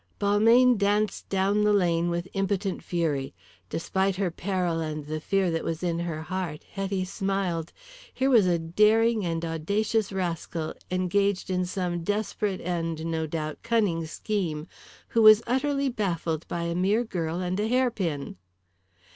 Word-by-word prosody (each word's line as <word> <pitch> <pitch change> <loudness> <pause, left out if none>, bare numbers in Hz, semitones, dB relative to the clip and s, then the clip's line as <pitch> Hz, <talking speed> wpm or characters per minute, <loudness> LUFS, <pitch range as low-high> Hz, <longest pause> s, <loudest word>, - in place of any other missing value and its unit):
Balmayne 225 +4 +5
danced 205 +1 0
down 195 +2 +2
the 210 - +4
lane 175 -3 +2
with 170 +1 -2
impotent 195 0 -1
fury. 150 -6 -1 0.3
Despite 190 +3 0
her 185 -2 -1
peril 180 -2 -1
and 155 -2 -4
the 155 +1 -3
fear 195 0 +1
that 165 - -1
was 165 +1 -3
in 170 -1 0
her 165 -2 -3
heart, 180 -3 -4
Hetty 195 -1 -2
smiled. 185 -4 -2 0.4
Here 265 +1 +1
was 220 -7 +6
a 175 -1 +3
daring 215 +6 +3
and 165 -1 -2
audacious 200 +7 0
rascal 170 -3 -3 0.2
engaged 190 +1 0
in 180 -1 0
some 180 -2 -2
desperate 205 0 -1
and, 165 -2 -2
no 160 -1 -1
doubt, 155 -1 -4
cunning 200 -9 +1
scheme 165 -4 -3 0.4
who 230 - +2
was 215 +1 +8
utterly 275 +3 0
baffled 170 - -2
by 170 - -3
a 170 0 -1
mere 195 +6 +2
girl 170 -6 -3
and 185 +1 -2
a 210 - +1
hairpin. 220 - -1
185 Hz, 150 wpm, -27 LUFS, 165-205 Hz, 0.4 s, was